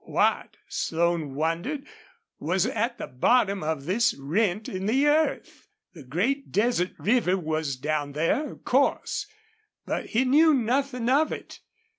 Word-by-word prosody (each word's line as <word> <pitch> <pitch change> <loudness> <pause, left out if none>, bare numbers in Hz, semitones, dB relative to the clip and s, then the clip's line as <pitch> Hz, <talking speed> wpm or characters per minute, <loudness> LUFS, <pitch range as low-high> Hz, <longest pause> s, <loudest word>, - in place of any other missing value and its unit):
What, - - 0
Slone 165 -4 -1
wondered, 170 - -2 0.5
was 180 +4 +1
at 230 +3 -1
the - - -5
bottom 200 - +2
of 155 -3 -3
this 220 +6 +2
rent 185 +8 -1
in 190 +1 -4
the 265 +6 +3
earth? 305 +2 0 0.3
The 165 - -12
great 200 - -2
desert 205 -2 +1
river 210 -4 +2
was 155 -5 -2
down 145 +1 -2
there, 165 - 0
of - - -19
course, 280 +9 +1 0.6
but - - -3
he 240 +4 +1
knew 305 +4 +5
nothing 250 0 0
of 285 +5 +3
it. - - -7
200 Hz, 140 wpm, -26 LUFS, 160-255 Hz, 0.6 s, knew